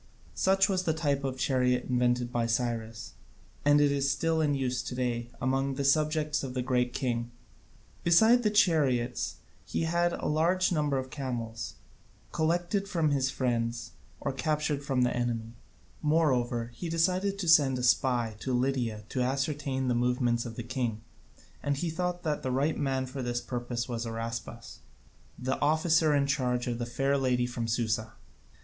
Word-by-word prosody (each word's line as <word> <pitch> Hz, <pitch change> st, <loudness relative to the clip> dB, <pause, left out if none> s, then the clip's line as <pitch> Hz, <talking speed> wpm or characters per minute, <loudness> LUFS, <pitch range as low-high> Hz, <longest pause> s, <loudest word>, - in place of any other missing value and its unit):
Such 190 Hz, 0 st, +3 dB
was 190 Hz, -3 st, +1 dB
the 160 Hz, -3 st, 0 dB
type 145 Hz, -3 st, 0 dB
of 130 Hz, -1 st, -2 dB
chariot 125 Hz, -1 st, +1 dB
invented 125 Hz, -1 st, +1 dB
by 120 Hz, -1 st, 0 dB
Cyrus, 115 Hz, -2 st, -2 dB, 0.5 s
and 145 Hz, 0 st, +5 dB
it 145 Hz, -1 st, +4 dB
is 140 Hz, -1 st, +1 dB
still 165 Hz, +3 st, +1 dB
in 145 Hz, -2 st, +2 dB
use 130 Hz, -2 st, -1 dB
to 125 Hz, -, -6 dB
day 120 Hz, -2 st, -2 dB
among 135 Hz, +2 st, 0 dB
the 140 Hz, -, -2 dB
subjects 155 Hz, +1 st, +2 dB
of 130 Hz, -1 st, -5 dB
the 125 Hz, -, -1 dB
Great 125 Hz, -1 st, +1 dB
King. 120 Hz, -2 st, -2 dB, 0.7 s
Beside 220 Hz, +9 st, +6 dB
the 215 Hz, -, +2 dB
chariots 140 Hz, -, +2 dB, 0.3 s
he -, -, -2 dB
had 170 Hz, +1 st, +1 dB
a -, -, -5 dB
large 175 Hz, +5 st, +2 dB
number 150 Hz, -4 st, +1 dB
of 130 Hz, 0 st, -4 dB
camels, 120 Hz, -6 st, -4 dB, 0.6 s
collected 175 Hz, +5 st, 0 dB
from 165 Hz, -6 st, +1 dB
his 135 Hz, -2 st, +1 dB
friends 120 Hz, -3 st, -2 dB, 0.3 s
or 140 Hz, -, -2 dB
captured 150 Hz, +1 st, -1 dB
from 135 Hz, -3 st, +1 dB
the 125 Hz, -, +1 dB
enemy. 115 Hz, -2 st, -2 dB, 0.5 s
Moreover, 125 Hz, -7 st, +1 dB
he 170 Hz, -, -5 dB
decided 185 Hz, +4 st, +1 dB
to 190 Hz, -3 st, -3 dB
send 145 Hz, -5 st, +5 dB
a 125 Hz, -, -3 dB
spy 125 Hz, -2 st, +2 dB
into 110 Hz, +5 st, -4 dB
Lydia 125 Hz, -4 st, -1 dB
to 130 Hz, -, -2 dB
ascertain 135 Hz, 0 st, -1 dB
the 125 Hz, -, +2 dB
movements 120 Hz, 0 st, +1 dB
of 115 Hz, -, -8 dB
the 120 Hz, -, -5 dB
king, 120 Hz, -3 st, -2 dB, 0.6 s
and 140 Hz, -1 st, -1 dB
he 165 Hz, +3 st, -2 dB
thought 180 Hz, +1 st, -2 dB
that 150 Hz, -3 st, -1 dB
the 130 Hz, -, -2 dB
right 140 Hz, +5 st, +1 dB
man 135 Hz, -2 st, -1 dB
for 130 Hz, +1 st, -6 dB
this 120 Hz, -1 st, -1 dB
purpose 120 Hz, -1 st, -4 dB
was 115 Hz, -2 st, -3 dB
Araspas, 115 Hz, +1 st, -6 dB, 0.6 s
the 130 Hz, +1 st, -2 dB
officer 155 Hz, +1 st, +3 dB
in 140 Hz, -1 st, +3 dB
charge 125 Hz, -3 st, 0 dB
of 120 Hz, -1 st, -3 dB
the 120 Hz, -, -3 dB
fair 135 Hz, +3 st, 0 dB
lady 125 Hz, -2 st, +1 dB
from 120 Hz, -1 st, -3 dB
Susa. 110 Hz, -1 st, -1 dB
130 Hz, 170 wpm, -29 LUFS, 120-155 Hz, 0.7 s, Beside